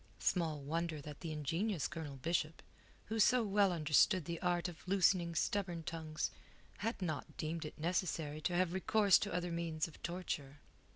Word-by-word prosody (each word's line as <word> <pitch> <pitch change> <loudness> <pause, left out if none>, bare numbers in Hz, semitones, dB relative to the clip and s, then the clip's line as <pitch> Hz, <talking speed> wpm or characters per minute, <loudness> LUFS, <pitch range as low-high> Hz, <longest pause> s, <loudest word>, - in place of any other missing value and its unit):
Small 165 -4 +1
wonder 160 +2 -2
that 145 0 -9
the 165 - -5
ingenious 165 +5 -1
Colonel 155 -3 -6
Bishop, 160 +2 -1 0.4
who 225 +1 -2
so 245 +3 +5
well 200 -2 +3
understood 160 +2 +3
the 170 +1 -4
art 175 -1 +1
of 175 +1 -10
loosening 180 -3 +3
stubborn 175 -1 0
tongues, 160 -2 -3 0.5
had 225 +2 -2
not 155 -6 -4
deemed 160 +1 -3
it 150 - -7
necessary 160 -2 -1
to 175 +3 0
have 180 -1 +2
recourse 200 +1 +4
to 205 - -2
other 175 0 -1
means 165 -2 -1
of 165 - -15
torture. 160 -5 -4
170 Hz, 165 wpm, -36 LUFS, 155-185 Hz, 0.5 s, so